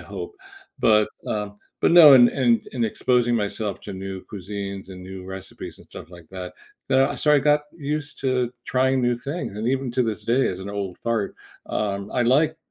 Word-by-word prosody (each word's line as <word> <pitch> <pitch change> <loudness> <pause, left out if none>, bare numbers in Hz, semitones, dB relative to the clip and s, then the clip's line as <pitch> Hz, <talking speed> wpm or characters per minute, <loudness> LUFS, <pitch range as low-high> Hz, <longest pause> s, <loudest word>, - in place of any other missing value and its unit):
hope." - - -7 0.4
But, 105 -1 +4 0.2
uh, 105 -1 -2 0.3
but - - +4
no, 155 -5 +10
and 120 -2 +8
and 120 -5 +1
and 120 -3 0
exposing 120 +2 +1
myself 105 0 -3
to 100 - -7
new 95 0 -6
cuisines 100 -1 -6
and 90 -1 -10
new 95 0 -9
recipes 95 -1 -8
and - - -17
stuff - - -11
like 85 -2 -14
that, 90 -1 -7 0.4
uh, 135 +1 +3
so 150 +3 +3
I - - +6
got 150 +1 +2
used 150 0 -4
to 130 -2 0
trying 130 0 +1
new 120 0 +2
things, 140 - -5
and 110 - -1
even 135 -1 -1
to 125 - +2
this 110 -3 -3
day, 125 +3 +2
as 90 - -4
an 100 +1 -6
old 100 -3 -4
fart, 115 -3 -1 0.3
um, 100 -1 -3
I 125 - +2
like 150 +6 +3
115 Hz, 195 wpm, -23 LUFS, 100-130 Hz, 0.4 s, no